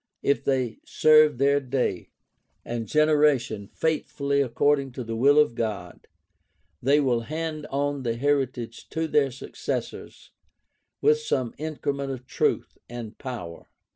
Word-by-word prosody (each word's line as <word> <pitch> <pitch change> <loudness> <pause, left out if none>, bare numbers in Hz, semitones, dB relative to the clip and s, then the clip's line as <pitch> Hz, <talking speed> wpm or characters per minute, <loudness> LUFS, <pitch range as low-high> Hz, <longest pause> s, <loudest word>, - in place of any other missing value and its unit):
If 140 - +1
they 130 -5 -1
serve 155 -3 +5
their 140 +2 +3
day 130 -8 -2 0.6
and 115 -2 -4
generation 145 -8 +2
faithfully 140 -2 -1
according 140 +1 +1
to 125 - -5
the 115 0 -4
will 140 +5 +4
of 150 -5 +5
God, 105 -7 -4 0.7
they 140 +4 +4
will 130 -5 +2
hand 155 +4 -4
on 140 0 -1
the 115 -2 -1
heritage 130 -3 -1
to 160 0 -2
their 145 -3 +3
successors 130 +1 -6 0.7
with 450 +1 +4
some 130 - -1
increment 140 -3 -3
of 130 -1 -7
truth - - -1
and 120 -3 -7
power. 115 -11 -7
135 Hz, 130 wpm, -25 LUFS, 120-145 Hz, 0.7 s, serve